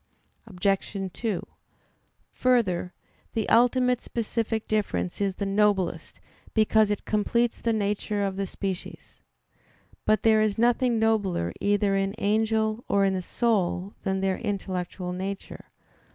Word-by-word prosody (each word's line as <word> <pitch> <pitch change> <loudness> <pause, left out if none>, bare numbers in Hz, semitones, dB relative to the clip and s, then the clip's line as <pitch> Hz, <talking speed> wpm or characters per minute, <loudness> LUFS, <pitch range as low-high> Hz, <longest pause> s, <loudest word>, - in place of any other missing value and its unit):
Obj. 195 0 -1
2: 220 -6 -3 0.9
Further, 210 -9 +1 0.4
the 220 -2 -1
ultimate 250 +1 +4
specific 225 -1 -2
difference 205 -3 -1
is 195 -2 0
the 200 - -3
noblest, 195 -4 0 0.4
because 220 -1 +4
it 205 - -2
completes 235 +3 0
the 230 - +1
nature 210 -1 -1
of 195 -1 -1
the 195 0 -2
species. 190 0 -6 0.9
But 215 -2 +2
there 220 -1 +5
is 215 -2 +1
nothing 240 +1 +3
nobler 205 - +1
either 205 -1 +2
in 195 0 0
an - - -11
angel 220 +2 +1
or 200 0 +3
in 195 - +2
the 185 - -1
soul 195 -3 0
than 190 -1 -1
their 190 -1 0
intellectual 185 -2 -3
nature. 195 +2 -6
205 Hz, 130 wpm, -26 LUFS, 195-220 Hz, 0.9 s, there